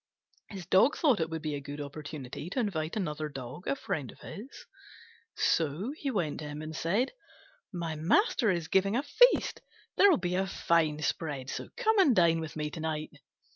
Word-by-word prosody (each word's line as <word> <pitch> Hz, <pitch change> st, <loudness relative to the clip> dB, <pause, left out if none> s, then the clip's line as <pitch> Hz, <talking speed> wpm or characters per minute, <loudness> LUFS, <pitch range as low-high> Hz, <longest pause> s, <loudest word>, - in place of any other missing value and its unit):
His 190 Hz, -4 st, -7 dB
dog 190 Hz, -, +4 dB
thought 275 Hz, -9 st, +3 dB
it 160 Hz, -1 st, 0 dB
would 160 Hz, -1 st, -5 dB
be 155 Hz, -1 st, -2 dB
a 145 Hz, -, -2 dB
good 145 Hz, +1 st, -7 dB
opportunity 145 Hz, 0 st, -7 dB
to 255 Hz, -, -2 dB
invite 165 Hz, -9 st, -1 dB
another 155 Hz, -6 st, -2 dB
Dog, 135 Hz, +4 st, -8 dB
a -, -, +1 dB
friend 145 Hz, -, -4 dB
of -, -, -19 dB
his; 235 Hz, +8 st, -10 dB, 0.7 s
so 165 Hz, -, +1 dB
he 290 Hz, -3 st, -3 dB
went 175 Hz, -, -1 dB
to 150 Hz, -, -6 dB
him 150 Hz, +1 st, -6 dB
and 155 Hz, 0 st, -6 dB
said, 200 Hz, +12 st, 0 dB, 0.6 s
"My 170 Hz, -4 st, -3 dB
master 225 Hz, -, +2 dB
is 170 Hz, -4 st, 0 dB
giving 195 Hz, +4 st, +2 dB
a 265 Hz, -, +1 dB
feast: -, -, +4 dB, 0.4 s
there'll 400 Hz, -3 st, +7 dB
be 180 Hz, -1 st, -2 dB
a 190 Hz, +1 st, +1 dB
fine 160 Hz, -5 st, +1 dB
spread, 145 Hz, -6 st, -2 dB
so -, -, -5 dB
come 445 Hz, -3 st, +3 dB
and 290 Hz, -11 st, +5 dB
dine 170 Hz, -3 st, +4 dB
with 160 Hz, -1 st, -6 dB
me 150 Hz, -1 st, -3 dB
to 165 Hz, -, -7 dB
night." 155 Hz, -1 st, -3 dB
165 Hz, 190 wpm, -30 LUFS, 150-210 Hz, 0.7 s, there'll